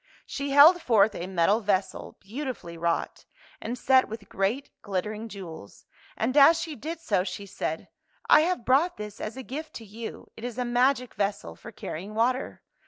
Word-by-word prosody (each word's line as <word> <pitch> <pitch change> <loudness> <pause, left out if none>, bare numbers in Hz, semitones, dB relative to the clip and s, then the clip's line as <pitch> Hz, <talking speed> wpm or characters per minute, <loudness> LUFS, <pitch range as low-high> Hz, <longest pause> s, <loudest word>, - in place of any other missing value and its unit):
She 280 0 -4
held 300 +6 +7
forth 220 -6 +4
a 175 - -5
metal 190 +3 +2
vessel, 195 -3 -2
beautifully 225 - -6
wrought, 170 0 -2 0.4
and 240 +3 -4
set 260 +1 +4
with 215 -2 -8
great 215 +9 -1
glittering 210 +3 -3
jew 200 -3 -8
els, 160 -11 -12 0.3
and 245 +4 -1
as 300 +3 +7
she 325 -2 -5
did 320 +6 -6
so, 205 - 0
she 190 +1 -6
said, 160 -4 -4 0.2
" - - -26
I - - +8
have 340 -6 -1
brought 295 +8 +3
this 210 -1 -8
as 215 +4 -5
a 265 - -6
gift 305 +5 -7
to 225 - -8
you. 220 +2 -9
It 225 - -12
is 245 -1 -5
a 250 - -1
magic 250 +1 +1
vessel 205 0 -2
for 230 - -11
cariying 200 0 -7
water. 250 +4 0
225 Hz, 185 wpm, -27 LUFS, 200-270 Hz, 0.4 s, I